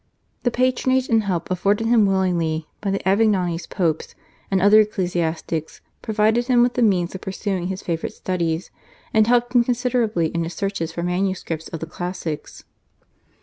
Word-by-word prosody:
The 245 - +1
patronage 255 +1 +1
and 225 -3 +3
help 180 -2 -2
afforded 200 +4 +1
him 225 -3 +4
willingly 170 -5 0
by 200 - -2
the 195 0 -2
Avignonese 190 -5 +2
Popes 165 -4 -1 0.3
and 195 - +2
other 205 +3 +6
ecclesiastics 170 -6 -2 0.2
provided 220 +3 +1
him 245 -2 +5
with 245 0 +1
the 250 - -1
means 185 -6 +2
of 190 - -7
pursuing 190 -1 -3
his 190 0 -5
favourite 165 -2 -3
studies, 170 -2 -2 0.4
and 220 0 +4
helped 245 0 +2
him 245 -1 +5
considerably 235 -8 0
in 170 +1 -2
his 165 +1 -5
searches 195 -5 -2
for 170 +1 -4
manuscripts 180 -3 -2
of 165 - -7
the - - -2
classics. 170 -2 -6
190 Hz, 160 wpm, -22 LUFS, 170-220 Hz, 0.4 s, other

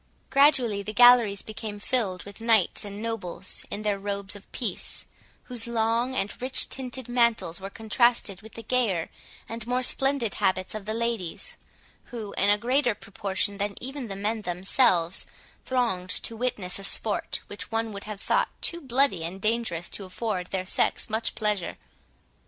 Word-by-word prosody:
Gradually 265 -7 +4
the 215 +2 -5
galleries 240 -4 +7
became 215 -1 -6
filled 205 -5 0
with 200 +2 -11
knights 225 -5 +3
and 205 +1 -7
nobles, 225 -6 -2
in 210 - -4
their 205 -2 0
robes 200 0 -3
of 205 - -13
peace, - - -2 0.4
whose 240 -3 -3
long 235 +2 +1
and 205 +1 -2
rich 255 +1 +2
tinted 260 -1 -4
mantles 235 -8 +2
were 195 +1 -6
contrasted 220 -2 +2
with 220 +1 -13
the 230 - -7
gayer 220 -8 +1 0.4
and 230 0 -5
more 250 +1 +1
splendid 270 -3 +2
habits 185 0 0
of 215 -2 -6
the 215 - -1
ladies, 235 - -2 0.5
who, 220 -4 -7
in 200 - +3
a 205 - +5
greater 245 +1 +2
proportion 200 0 -2
than 200 0 -1
even 265 0 -4
the 195 - -5
men 215 +3 -2
themselves, 180 -1 +2 0.4
thronged 230 -8 0
to 225 - -5
witness 215 -6 -1
a - - -8
sport, 205 +1 0
which 205 - -8
one 225 -1 -1
would 200 - -7
have 210 -2 -6
thought - - +1
too 340 0 0
bloody 255 - +2
and 175 +4 -4
dangerous 215 -6 0
to 200 - -6
afford 185 -1 -3
their 185 -1 -2
sex 195 - +1
much 220 +1 -1
pleasure. 210 -5 -1
215 Hz, 165 wpm, -27 LUFS, 195-240 Hz, 0.5 s, galleries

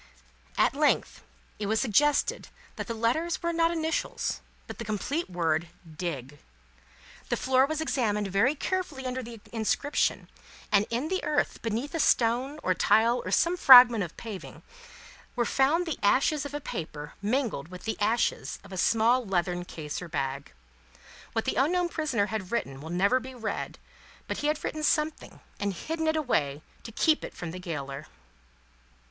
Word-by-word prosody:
At - - +3
length, - - +1 0.4
it 205 - -2
was 220 +1 +1
suggested 285 +5 +2 0.3
that - - -5
the 230 - -3
letters 315 +11 0
were 340 0 0
not 330 0 +3
initials, 320 -1 -2 0.2
but - - -9
the - - -3
complete 240 - -2
word, 170 -2 0 0.3
DIG. 145 -5 -5 0.9
The - - +1
floor 260 +1 +3
was 315 +1 -2
examined 210 -9 0
very 215 +10 +2
carefully 305 -5 -3
under 255 0 -2
the 235 -2 -9
inscription, 230 +6 0 0.4
and, 205 0 +4
in 245 +7 -2
the 375 - -1
earth 300 -1 0
beneath 230 +5 -3
a 330 - -2
stone, 255 +3 +2
or 185 - +2
tile, 230 +6 +3
or - - -5
some 340 +2 +2
fragment 245 - +9
of 170 - -8
paving, 215 -5 -8 0.7
were 240 -1 +1
found 295 +9 +2
the 325 -5 -4
ashes 275 +7 +2
of 285 - -8
a - - -2
paper, 155 - -6
mingled 215 - -1
with 180 +1 -10
the 220 - -2
ashes 225 +3 0
of 200 -1 -12
a - - -5
small 230 +5 +3
leathern 175 -3 -1
case 155 -3 -6
or 180 - -6
bag. 135 -2 -3 0.8
What - - -1
the - - 0
unknown 345 +6 +2
prisoner 300 -11 0
had 205 -3 -5
written 135 -13 -2
will 160 - -8
never 200 +9 +2
be 260 +1 -9
read, 225 -3 -4 0.5
but - - -3
he 295 - -1
had 300 0 -1
written 310 - -3
something, 305 +1 -1 0.2
and 200 -2 -1
hidden 320 - -3
it 315 - +2
away 155 - 0 0.2
to 230 - -9
keep 310 +7 +2
it - - -7
from 175 -2 -6
the 185 - -7
gaoler." 140 -5 -5
235 Hz, 170 wpm, -28 LUFS, 185-295 Hz, 0.9 s, fragment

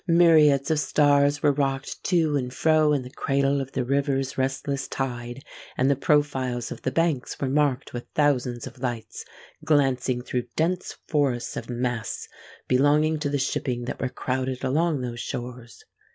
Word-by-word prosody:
Myriads 160 -4 +5
of 155 - +2
stars 145 0 +3
were 145 - +5
rocked 135 -1 -2
to 160 -5 +2
and 125 -3 -1
fro 155 +2 +3
in 140 -3 +1
the 125 - -10
cradle 140 0 +1
of 135 0 -7
the 130 - 0
river's 135 0 0
restless 135 +1 -2
tide; 120 -1 -4 0.3
and 130 +2 +3
the - - +3
profiles 135 -4 0
of - - -7
the - - -1
banks 155 -2 -1
were 135 - -1
marked 140 -1 0
with 120 0 -6
thousands 125 -5 +1
of - - -10
lights, 120 -3 -4 0.4
glancing 130 -4 +1
through 125 -1 -3
dense 175 +3 -1
forests 135 -5 0
of - - -6
masts 120 -2 -3 0.4
belonging 150 +4 +3
to 145 -1 -1
the 145 - 0
shipping 125 -2 -2
that - - -5
were 130 - 0
crowded 130 0 -3
along 150 +2 +1
those 120 -1 -5
shores. 120 -1 -7
135 Hz, 165 wpm, -25 LUFS, 125-145 Hz, 0.4 s, Myriads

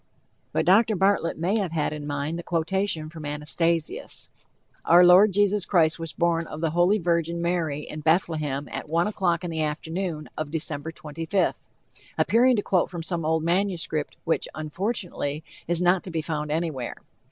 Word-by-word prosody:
But - - 0
Dr. 215 +5 +5
Bartlett 190 -3 +1
may 185 +7 +1
have 185 -5 -2
had 155 -2 0
in 150 -1 -6
mind 145 +3 -3
the - - -6
quotation 165 0 -1
from 160 0 -10
Anastasius: 150 +3 -1 0.5
"Our 175 +1 +7
Lord, 185 +4 +7
Jesus 205 0 +2
Christ, 165 -4 +3
was 165 -1 -5
born 170 +2 0
of 155 - -7
the 160 -1 0
Holy 175 +5 +3
Virgin, 170 -2 0
Mary, 170 -4 -1
in 155 - -7
Bethlehem, 155 -3 0
at - - -6
one 170 +2 +2
o'clock 185 -4 0
in 175 - -3
the 160 -1 -2
afternoon 160 +2 -3
of 155 -1 -4
December 155 -1 -3
25th," 165 +4 -2 0.5
appearing 250 +3 +4
to 205 - -1
quote 185 -3 +1
from 175 -2 -6
some 170 -1 -2
old 160 0 +1
manuscript 170 -4 -1
which, 165 - 0
unfortunately, 155 -2 -3 0.2
is 175 +1 +1
not 175 +1 +3
to - - -6
be 165 -2 -2
found 150 -2 -3
anywhere. 155 -6 -2
165 Hz, 170 wpm, -25 LUFS, 155-180 Hz, 0.5 s, Our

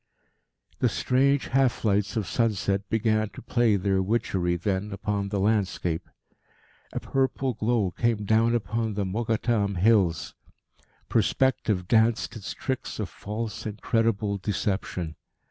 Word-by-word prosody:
The - - +3
strange 140 +2 +2
half 130 -3 +2
lights 105 +1 +1
of 110 - 0
sunset 100 -1 0
began 110 -1 +1
to - - -11
play 120 -3 +2
their 95 0 +1
witchery 95 -4 0
then 95 +3 -2
upon 100 0 -2
the 100 0 -1
landscape. 95 -5 0 0.8
A - - -3
purple 135 -1 0
glow 110 -3 0
came 110 +2 0
down 115 +3 +3
upon 110 0 -1
the 100 -1 -1
Mokattam 110 0 0
Hills. 95 -3 +2 0.7
Perspective 110 -8 +1
danced 110 -1 +2
its 100 -4 -6
tricks 130 -2 -3
of 105 -5 -2
false, 105 +4 -5
incredible 105 -1 0
deception. 95 -4 -2
105 Hz, 125 wpm, -26 LUFS, 100-115 Hz, 0.8 s, The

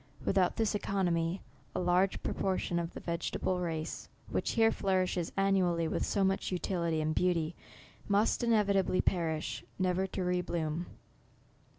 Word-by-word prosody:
Without 185 -2 +2
this 220 -2 +1
eco 200 -1 -3
nomy, 170 +1 0 0.3
a - - 0
large 180 +2 +2
proportion 185 -2 -1
of 170 0 -4
the - - -5
vegetable 175 +2 -2
race, 160 -3 -4 0.2
which - - 0
here 225 -1 +4
flourishes 185 -3 0
annually 185 -4 +2
with - - -1
so 200 - +1
much 195 0 0
utility 170 -3 0
and 155 0 0
beauty, 170 -2 +1 0.5
must 205 +4 +2
inevitably 200 -5 +3
pe 185 - +2
rish, 160 -2 -2
never 185 0 +1
to 190 0 -3
re 180 0 +1
bloom. 165 -1 -2
180 Hz, 150 wpm, -32 LUFS, 170-195 Hz, 0.5 s, here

